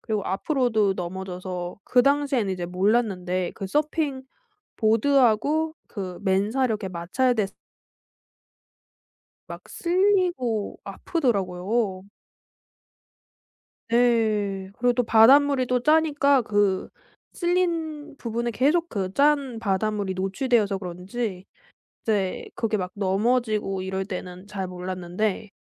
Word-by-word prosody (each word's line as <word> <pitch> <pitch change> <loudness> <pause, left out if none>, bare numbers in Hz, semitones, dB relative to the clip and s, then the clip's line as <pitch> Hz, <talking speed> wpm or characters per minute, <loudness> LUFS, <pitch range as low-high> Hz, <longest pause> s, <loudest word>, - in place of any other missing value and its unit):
그리고 215 -3 -2
앞으로도 220 - +1
넘어져서 180 0 -5
그 250 - +4
당시에는 275 -7 +1
이제 180 -2 -4
몰랐는데 185 -2 0
그 195 - -5
서핑 295 +3 -1 0.5
보드하고 270 +6 +2
그 185 -4 -6
맨살 205 +7 +1
이렇게 215 -4 -2
마찰됐 195 +5 0 1.9
막 - - -10
쓸리고 350 - +1
아프더라고요. 200 - -1 1.8
네. 215 -5 +1
그리고 245 0 +3
또 245 - +2
바닷물이 260 +4 +5
또 250 0 +1
짜니까 295 -3 +3
그 205 -3 +1 0.4
쓸린 335 -5 -1
부분에 235 -1 -3
계속 295 +9 +1
그 190 - -3
짠 280 -2 +2
바닷물이 205 -1 -1
노출되어서 200 +1 +1
그런지 185 +2 -5 0.6
이제 200 -4 -1
그게 220 -2 0
막 185 -2 -4
넘어지고 210 0 0
이럴 190 0 -3
때는 185 0 -7
잘 195 -2 -4
몰랐는데 185 +3 -3
215 Hz, 235 characters per minute, -25 LUFS, 190-260 Hz, 1.9 s, 바닷물이